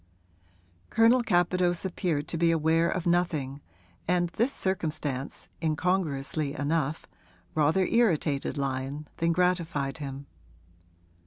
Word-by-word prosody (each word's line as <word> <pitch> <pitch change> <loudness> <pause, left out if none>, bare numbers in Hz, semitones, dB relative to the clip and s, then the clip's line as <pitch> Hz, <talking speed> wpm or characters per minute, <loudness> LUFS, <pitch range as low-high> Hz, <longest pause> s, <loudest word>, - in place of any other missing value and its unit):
Colonel 230 +3 +5
Capadose 180 -3 +1
appeared 165 -5 -1
to - - -3
be 170 0 +4
aware 165 +1 +3
of 185 - -2
nothing, 155 -6 0 0.5
and 175 0 +2
this 235 +10 0
circumstance, 155 - -3
incongruously 155 -3 0
enough, 150 +1 -1 0.5
rather 155 +5 +3
irritated 160 - +1
Lyon 135 +2 -3
than 165 0 +2
gratified 165 -5 0
him. 140 -1 -6
165 Hz, 100 wpm, -28 LUFS, 145-180 Hz, 0.5 s, Colonel